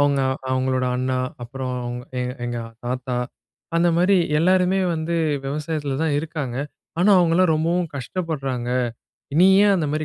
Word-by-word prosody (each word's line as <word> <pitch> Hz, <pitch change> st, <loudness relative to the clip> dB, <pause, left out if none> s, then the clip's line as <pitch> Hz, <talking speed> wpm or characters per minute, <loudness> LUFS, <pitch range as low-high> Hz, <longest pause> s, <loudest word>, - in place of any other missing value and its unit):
அவங்க, 140 Hz, -1 st, +3 dB, 0.3 s
அவங்களோட 130 Hz, 0 st, +1 dB
அண்ணா, 130 Hz, 0 st, -1 dB, 0.3 s
அப்புறம் 130 Hz, +1 st, -5 dB, 0.5 s
எங் 125 Hz, 0 st, -3 dB
எங்க 120 Hz, 0 st, -3 dB, 0.3 s
ஆத்தா 125 Hz, 0 st, -3 dB, 0.6 s
அந்த 175 Hz, +1 st, +4 dB
மாரி 185 Hz, +3 st, +4 dB, 0.2 s
எல்லாருமே 185 Hz, +2 st, +3 dB, 0.2 s
வந்து 165 Hz, +1 st, -2 dB, 0.3 s
விவசாயத்தில 145 Hz, -1 st, -2 dB
தான் 155 Hz, -3 st, +1 dB
இருக்காங்க. 150 Hz, -5 st, -4 dB, 0.4 s
ஆனா 190 Hz, +4 st, +4 dB
அவங்கலாம் 175 Hz, 0 st, +3 dB
ரொம்பவும் 170 Hz, +2 st, 0 dB
கஷ்டப்படுறாங்க. 135 Hz, -4 st, -3 dB, 0.7 s
"நீ 185 Hz, -, +8 dB, 0.2 s
ஏன் 200 Hz, -1 st, +5 dB
அந்த 165 Hz, -4 st, 0 dB
மாரி 155 Hz, 0 st, -1 dB
155 Hz, 130 wpm, -22 LUFS, 130-170 Hz, 0.7 s, நீ